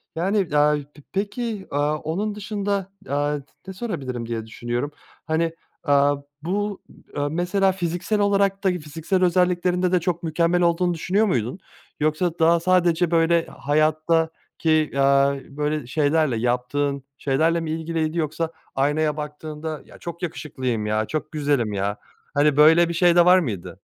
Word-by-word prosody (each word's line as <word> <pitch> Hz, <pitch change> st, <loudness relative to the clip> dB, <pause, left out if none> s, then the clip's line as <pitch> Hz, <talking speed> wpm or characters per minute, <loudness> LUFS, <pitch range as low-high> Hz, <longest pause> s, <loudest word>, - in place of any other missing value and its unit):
Yani, 185 Hz, -2 st, 0 dB
aaa, 150 Hz, 0 st, +4 dB, 0.2 s
p 145 Hz, -, -16 dB
peki, 210 Hz, +1 st, -3 dB
aaa, 145 Hz, +1 st, +1 dB
onun 200 Hz, +8 st, -3 dB
dışında, 200 Hz, -2 st, -3 dB, 0.2 s
aaa, 145 Hz, +1 st, 0 dB
t 135 Hz, -, -15 dB, 0.2 s
ne 190 Hz, -, -6 dB
sorabilirim 135 Hz, -, -4 dB
diye 115 Hz, -1 st, -4 dB
düşünüyorum. 120 Hz, +5 st, -3 dB, 0.3 s
Hani, 165 Hz, +1 st, 0 dB, 0.3 s
aaa, 145 Hz, -2 st, +4 dB, 0.3 s
bu, 200 Hz, +4 st, -2 dB, 0.4 s
ııı, 145 Hz, 0 st, 0 dB
mesela 180 Hz, +4 st, +2 dB
fiziksel 185 Hz, +3 st, -2 dB
olarak 200 Hz, -1 st, +2 dB
da 195 Hz, -, +4 dB
fiziksel 170 Hz, +2 st, -1 dB
özelliklerinde 180 Hz, 0 st, +2 dB
de 180 Hz, -, +4 dB
çok 175 Hz, 0 st, -2 dB
mükemmel 170 Hz, +2 st, +1 dB
olduğunu 175 Hz, +1 st, +2 dB
düşünüyor 190 Hz, +6 st, +1 dB
muydun? 125 Hz, -, -1 dB, 0.4 s
Yoksa 155 Hz, +3 st, 0 dB
daha 165 Hz, +1 st, +5 dB
sadece, 175 Hz, -1 st, +2 dB
böyle, 165 Hz, 0 st, +3 dB
hayattaki, 155 Hz, +1 st, 0 dB
aaa, 140 Hz, 0 st, +4 dB, 0.2 s
böyle, 150 Hz, -1 st, -2 dB
şeylerle, 150 Hz, -1 st, +1 dB
yaptığın 125 Hz, +4 st, -1 dB
şeylerle 160 Hz, +5 st, +1 dB
mi 160 Hz, -1 st, -4 dB
ilgiliydi 160 Hz, 0 st, -2 dB
yoksa 160 Hz, +1 st, -1 dB, 0.2 s
aynaya 150 Hz, +2 st, +1 dB
baktığında, 150 Hz, +1 st, -6 dB
"Ya, -, -, -15 dB
çok 170 Hz, 0 st, -8 dB
yakışıklıyım 130 Hz, -9 st, -3 dB
ya. 110 Hz, +1 st, 0 dB
Çok 155 Hz, +3 st, -4 dB
güzelim 140 Hz, -8 st, 0 dB
ya." 100 Hz, +2 st, -1 dB, 0.4 s
Hani, 145 Hz, 0 st, +3 dB
böyle 165 Hz, +3 st, +6 dB
bir -, -, -2 dB
şey 175 Hz, 0 st, +4 dB
de 175 Hz, -, +6 dB
var 180 Hz, +1 st, +7 dB
mıydı? 110 Hz, -, -5 dB
160 Hz, 145 wpm, -23 LUFS, 145-180 Hz, 0.4 s, var